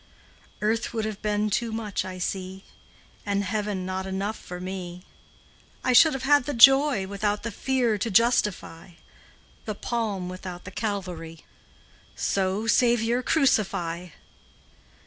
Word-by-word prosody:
Earth 220 +2 -1
would 220 -1 -1
have 215 -2 -5
been 210 0 0
too 230 +3 0
much, 220 -3 -3
I 185 -1 -7
see, 190 +1 -4 0.6
And 200 -1 -1
heaven 205 -1 -2
not 190 +1 -3
enough 195 +3 -2
for 180 -3 -9
me; 180 -1 -6 0.8
I 255 - +2
should 310 +6 +7
have 270 -1 -4
had 285 -1 +4
the 290 - -3
joy 270 -3 +6
Without 205 +1 -2
the 230 - -3
fear 240 -2 0
to 230 - -1
justify, 205 -6 +1 0.7
The 215 - -4
palm 210 -5 -3
without 185 -1 -7
the 185 - -9
Calvary; 180 -6 -5 0.7
So, 195 +2 -1
Saviour, 235 +1 +2
crucify. 185 - +1
205 Hz, 130 wpm, -26 LUFS, 185-230 Hz, 0.8 s, should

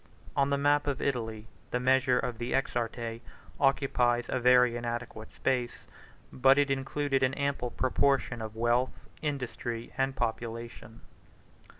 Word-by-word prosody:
On 140 0 +2
the 140 - +2
map 145 +1 +2
of 140 -2 -1
Italy, 110 -5 -2 0.2
the 125 - -1
measure 130 0 +3
of 120 -2 -2
the 120 +1 -3
exarchate 115 -3 -2 0.4
occupies 125 -3 +2
a 130 - 0
very 125 -1 +5
inadequate 120 -2 -5
space, 125 -2 -2 0.5
but 135 +1 +5
it 145 -1 +3
included 135 0 0
an 130 +1 +2
ample 140 -3 -1
proportion 130 -1 +1
of 110 0 -6
wealth, 120 +3 0
industry, 120 -5 -4
and 135 0 +1
population. 115 -1 -4
125 Hz, 130 wpm, -30 LUFS, 120-135 Hz, 0.5 s, very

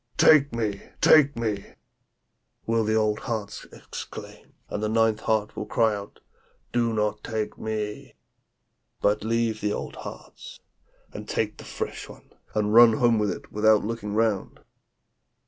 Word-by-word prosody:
"Take 145 -2 +6
me! 110 -4 -2 0.2
take 145 -4 +5
me!" 105 -4 -3 0.9
will 115 0 +1
the 110 0 0
eight - - +2
old 110 -1 +1
hearts 110 -4 -5
exclaim; - - -10
and 105 - -4
the 110 - -1
ninth 110 -1 +2
heart 110 -1 -1
will - - -5
cry 115 -2 +2
out, 100 0 -9 0.5
"Do 120 -1 +2
not 105 -1 -1
take 110 -1 -4
me!" 105 -1 -4 0.8
But 105 +1 +1
leave 115 -1 0
the 105 0 0
old - - -6
hearts - - -10 0.5
and 105 0 -8
take 105 -1 -1
the - - -11
fresh - - -5
one, - - -15 0.2
and 105 0 +1
run 115 0 +8
home 115 -1 +3
with 105 -1 +1
it - - -6
without 110 0 +3
looking 105 -2 -4
round.' 110 -3 0
110 Hz, 150 wpm, -25 LUFS, 105-115 Hz, 0.9 s, run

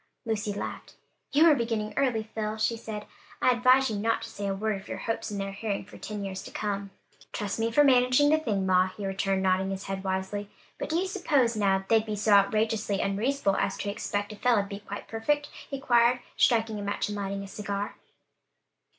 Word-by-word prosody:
Lucy 215 -2 -1
laughed. 200 - -6 0.4
"You 300 +4 +5
are 325 - +8
beginning 225 -5 -1
early, 250 -5 +1
Phil," 215 0 -2
she 220 +1 +1
said. 215 -2 -6 0.3
"I - - +4
advise 255 +1 +4
you 210 - -2
not 225 +2 0
to - - -7
say 200 0 -5
a 195 - -1
word 210 0 -1
of - - -16
your - - -4
hopes 225 0 -3
in 205 - -4
their 195 0 -3
hearing, 200 0 -3
for - - -13
ten 210 -2 -5
years 190 -1 -5
to - - -9
come." 200 -1 -3 0.4
"Trust 205 +1 -3
me 225 0 +1
for 295 +5 +5
managing 255 +2 +5
the 310 - +4
thing, 210 -10 -1
ma," 185 0 +4
he 195 +2 -7
returned, 195 0 0
nodding 190 0 +2
his 195 0 -4
head 195 0 -4
wisely. 190 +2 -2 0.3
"But - - -4
do 320 - -1
you 360 +3 +2
s'pose 290 - +1
now, 195 -2 +2
they'd 225 -1 +4
be 215 -1 -3
so 210 +1 0
outrageously 210 0 +3
unreasonable 200 +2 0
as 195 - 0
to 200 - -2
expect 205 0 -3
a - - -11
fellow 235 -3 +3
to - - -9
be 200 0 -6
quite 205 0 -8
perfect?" 290 +6 -1 0.2
he 275 - -4
queried, 240 -2 +3
striking 225 -3 +2
a - - -5
match 200 0 -1
and 210 - -4
lighting 200 -1 -3
a - - -8
cigar. 200 0 -4
210 Hz, 220 wpm, -28 LUFS, 200-235 Hz, 0.4 s, are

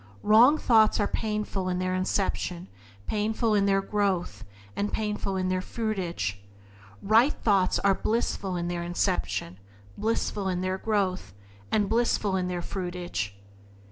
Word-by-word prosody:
Wrong 235 +8 +6
thoughts 220 -7 +4
are 205 - +2
painful 210 -3 -2
in 180 - -1
their 185 0 -1
inception, 185 -1 -1 0.4
painful 220 - 0
in 200 -1 +3
their 195 0 +2
growth, 195 -3 -1 0.3
and 205 0 -1
painful 210 -2 -2
in 185 0 0
their 185 0 0
fruitage. 180 - -3 0.6
Right 230 +8 +4
thoughts 195 -4 +2
are 200 -1 +3
blissful 200 -3 -1
in 175 0 -2
their 175 0 -2
inception, 170 - -2 0.4
blissful 215 -2 -1
in 180 -1 -1
their 185 +1 -2
growth, 190 - -1 0.4
and 205 -2 +2
blissful 220 -3 +1
in 185 -1 0
their 175 -1 -3
fruitage. 175 - -4
195 Hz, 140 wpm, -27 LUFS, 180-215 Hz, 0.6 s, Wrong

